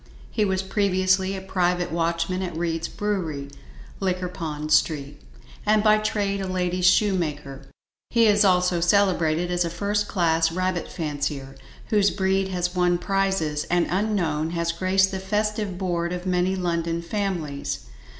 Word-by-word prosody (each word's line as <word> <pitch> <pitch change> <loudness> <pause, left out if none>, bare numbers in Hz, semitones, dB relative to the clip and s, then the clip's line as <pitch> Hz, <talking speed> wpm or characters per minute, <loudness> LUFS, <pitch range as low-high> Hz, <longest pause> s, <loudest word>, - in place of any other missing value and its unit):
He 215 - +1
was 190 -1 0
previously 190 -1 +1
a 190 - -5
private 180 -2 0
watchman 170 +2 -1
at 175 -4 -4
Reid's 165 -1 -1
brewery, 165 -9 -3 0.5
Liquorpond 175 -5 -3
Street, 145 -1 +1 0.4
and 215 0 +3
by 215 0 +5
trade 200 -2 -1
a 190 - -3
lady's 180 -1 0
shoemaker. 150 -9 0 0.4
He 230 -1 +4
is 210 -1 +5
also 180 -2 +3
celebrated 175 -2 +2
as 175 0 +1
a 170 - -2
first 205 +4 -1
class 165 -3 +2
rabbit 185 0 -2
fancier, 145 -3 -3 0.4
whose 205 -2 +4
breed 190 0 0
has 180 -1 -2
won 180 -1 +2
prizes, 190 -6 0
and 175 0 +1
unknown, 175 -6 0
has 170 0 0
graced 190 +3 +2
the 190 - -3
festive 210 0 -1
board 175 -2 -1
of 180 0 -5
many 185 +1 +1
London 170 -2 -1
families. 170 -7 -3
180 Hz, 140 wpm, -24 LUFS, 165-195 Hz, 0.5 s, by